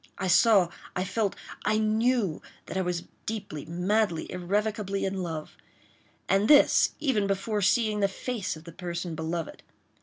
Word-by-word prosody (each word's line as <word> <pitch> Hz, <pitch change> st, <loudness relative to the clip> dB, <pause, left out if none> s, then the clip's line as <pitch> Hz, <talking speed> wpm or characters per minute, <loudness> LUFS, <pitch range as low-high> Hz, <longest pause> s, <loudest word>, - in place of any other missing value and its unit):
I 190 Hz, -, -3 dB
saw—I 185 Hz, -2 st, +3 dB
felt—I 210 Hz, +2 st, -2 dB
knew 220 Hz, -4 st, +1 dB, 0.2 s
that 165 Hz, -, -7 dB
I 190 Hz, -, +1 dB
was 175 Hz, -1 st, -2 dB, 0.2 s
deeply, 200 Hz, -10 st, -5 dB
madly, 180 Hz, +1 st, 0 dB
irrevocably 200 Hz, +2 st, -1 dB
in 190 Hz, 0 st, -2 dB
love—and 175 Hz, +4 st, -4 dB
this 295 Hz, -1 st, +6 dB
even 260 Hz, -10 st, +1 dB
before 200 Hz, +2 st, -1 dB
seeing 215 Hz, +1 st, +2 dB
the 200 Hz, -, +3 dB
face 210 Hz, 0 st, -4 dB
of 155 Hz, -, -12 dB
the 170 Hz, -, -10 dB
person 175 Hz, 0 st, -5 dB
beloved. 160 Hz, 0 st, -4 dB
195 Hz, 130 wpm, -28 LUFS, 175-215 Hz, 0.2 s, this